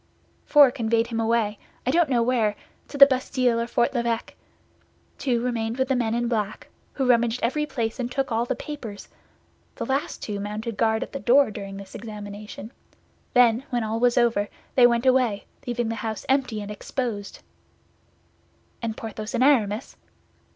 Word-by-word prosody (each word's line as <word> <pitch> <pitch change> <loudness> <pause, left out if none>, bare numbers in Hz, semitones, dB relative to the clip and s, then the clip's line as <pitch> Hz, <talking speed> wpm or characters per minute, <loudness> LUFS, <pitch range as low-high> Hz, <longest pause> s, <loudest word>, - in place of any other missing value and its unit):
"Four 290 -4 +7
conveyed 230 -1 +1
him 230 -1 -4
away, 225 -2 +1 0.3
I 255 - +2
don't 335 0 +3
know 240 -3 +2
where—to 230 +3 -2
the 275 - +11
Bastille 255 -3 +1
or 235 - -1
Fort 240 +1 +1
l'Evêque. 235 -2 -1 0.9
Two 245 -4 0
remained 230 -1 -2
with 260 +1 0
the 265 - +2
men 230 -2 0
in 240 0 0
black, 215 -3 -2 0.2
who 270 - -1
rummaged 235 -1 +3
every 300 +6 0
place 230 -4 -3
and 245 -1 -2
took 270 -1 -1
all 225 +1 +1
the 250 - -2
papers. 235 -8 -8 0.7
The - - -4
last 270 +2 -2
two 205 -2 -4
mounted 210 +3 -4
guard 220 0 +1
at - - -10
the 275 - -5
door 270 -1 +4
during 195 -1 -7
this 195 -1 -10
examination; 210 0 -8 0.6
then, 240 0 +5
when 240 -3 -1
all 220 +1 -2
was 245 +1 +3
over, 230 -4 +2 0.2
they 245 -2 +7
went 235 +1 0
away, 255 -6 +2 0.2
leaving 240 -1 -1
the - - -1
house 220 -1 -4
empty 255 -6 0
and 205 - -7
exposed." 210 -1 -4 1.4
"And 225 -2 -3
Porthos 220 +1 -5
and 245 - +2
Aramis?" 225 -6 +2
235 Hz, 170 wpm, -25 LUFS, 220-255 Hz, 1.4 s, the